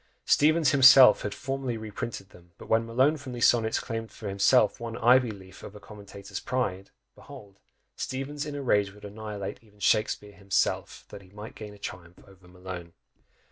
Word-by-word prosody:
Steevens 155 0 +3
himself 130 -3 +8
had 105 - -4
formerly 130 +2 -4
reprinted 110 -2 -7
them, 85 -1 -19
but - - -12
when 115 +1 +1
Malone 130 +7 +2
from 135 -3 -9
these 120 -1 +3
sonnets 115 -2 +2
claimed 115 0 -6
for 110 - -9
himself 100 +4 +3
one 115 -1 -6
ivy 125 +1 +4
leaf 95 -3 -11
of 105 - -11
a - - -10
commentator's 100 -1 -10
pride, 100 -7 -3 0.2
behold, 100 -1 -14 0.4
Steevens 140 +3 -5
in 145 - -6
a 140 - -5
rage 105 -5 +1
would 105 0 -14
annihilate 105 -1 -7
even 105 -2 -24
Shakspeare 105 0 0
himself, 100 -1 -2
that 100 - -10
he 95 - -18
might 105 +3 -10
gain 105 -1 -10
a - - -16
triumph 90 -3 -9
over 95 -2 -19
Malone! 90 -2 -9
105 Hz, 180 wpm, -27 LUFS, 100-125 Hz, 0.4 s, himself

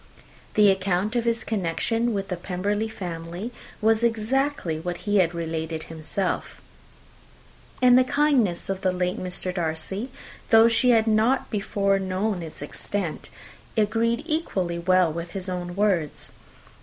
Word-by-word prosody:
The 210 -2 +7
account 190 +3 0
of 240 -1 +1
his 230 0 0
connection 225 +4 0
with 200 -2 -3
the 180 - -1
Pemberley 200 +5 -2
family 175 +2 -6 0.3
was 220 +1 +3
exactly 230 - 0
what 175 +1 -4
he 205 0 +2
had 175 -3 +3
related 160 -1 -3
himself; 165 +4 -3 1.2
and 250 0 +8
the - - +5
kindness 255 - +2
of 195 -1 -3
the 185 - +2
late 180 0 -1
Mr. 185 0 -3
Darcy, 175 +7 -2 0.4
though 225 -1 +7
she 235 +2 +3
had 225 -2 +5
not 225 +4 +2
before 200 -2 +1
known 190 +1 -1
its 160 -3 -8
extent, 180 +3 -4 0.5
agreed 230 +4 +1
equally 195 - -1
well 180 -2 +3
with 170 +1 -6
his 195 -1 -5
own 175 -1 -4
words. 190 -7 0
195 Hz, 140 wpm, -25 LUFS, 175-225 Hz, 1.2 s, and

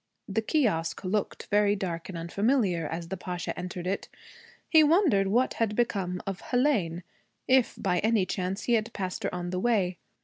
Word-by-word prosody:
The 215 +2 0
kiosque 205 - 0
looked 195 +2 -2
very 205 0 +4
dark 175 -4 -4
and 180 - -5
unfamiliar 185 - +1
as 165 +1 -5
the 190 - -3
Pasha 180 -1 -4
entered 180 0 -5
it. 195 +2 -2 0.6
He 315 -2 +6
wondered 300 - +4
what 240 +6 +2
had 215 -2 +1
become 190 -6 -1
of 195 -1 -4
Hélène 215 - +1 0.4
if 260 -2 +3
by 180 -3 +1
any 220 -2 +2
chance 185 +2 -3
he 240 - +1
had 225 0 +1
passed 185 -2 -4
her - - -2
on 175 0 -4
the 180 - -1
way. 190 -5 +1
195 Hz, 175 wpm, -28 LUFS, 180-225 Hz, 0.6 s, He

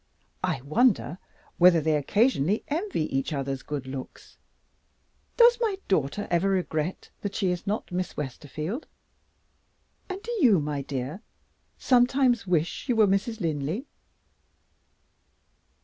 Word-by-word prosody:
I - - -1
wonder 165 - +2 0.4
whether 175 -1 +7
they 155 0 +1
occasionally 205 - +2
envy 335 - -1
each 135 +4 -1
other's 135 -1 -3
good 145 -3 -5
looks? 130 0 -9 1.0
Does 475 0 +6
my 430 -4 +1
daughter 190 +2 0
ever 175 +3 +2
regret 180 -3 -2
that 200 -1 -4
she 190 -4 +1
is 180 +2 -4
not 210 -1 -2
Miss 180 0 -3
Westerfield? 150 - -5 1.2
And 375 0 -4
do 475 - -5
you, 220 - +6
my 145 -1 -2
dear, 135 +6 -5 0.6
some 245 -2 +4
times 255 -5 +1
wish 175 - -1
you 245 - +3
were 220 -1 +6
Mrs. 205 +3 0
Linley?" 160 - -2
180 Hz, 125 wpm, -27 LUFS, 150-230 Hz, 1.2 s, whether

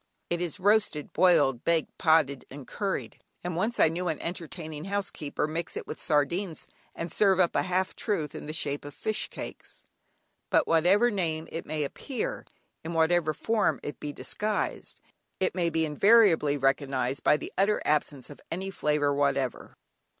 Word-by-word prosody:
It 175 0 0
is 175 +2 -3
roasted, 205 -6 +2
boiled, 135 -9 +4
baked, 165 -1 0
potted, 155 -5 +3
and 135 0 -9
curried, 200 +5 -4 0.2
and 175 -1 -3
once 215 +7 0
I - - +7
knew 175 +3 -2
an 160 -3 -1
enterprising 165 -2 -5
housekeeper 195 -8 -2
mix 160 +2 -4
it - - -5
with - - -7
sardines 160 +4 0 0.3
and 165 0 -5
serve 195 -3 +4
up 175 -2 +3
a - - +3
half 185 +1 -1
truth 165 -9 -2
in - - -7
the - - -3
shape 145 -2 -1
of 145 -1 -9
"fish 215 -1 -1
cakes." - - -7 0.6
But - - +4
under - - -1
whatever 190 +9 +4
name 165 -5 -2
it 165 - -5
may 155 -1 -1
appear, 245 - -4 0.4
in 165 +1 -5
whatever 165 0 +3
form 220 +7 0
it 145 - -6
be 150 - -4
disguised, 210 +7 -3 0.4
it - - +1
may 175 -2 +1
be 160 0 +1
invariably 165 -3 +4
recognised 135 -1 0
by 150 - +5
the - - -8
utter 200 +3 +2
absence 145 -2 0
of 145 - -12
any 190 +3 -4
flavour 150 -4 +1
whatever. 140 -2 -1
160 Hz, 170 wpm, -28 LUFS, 150-185 Hz, 0.6 s, I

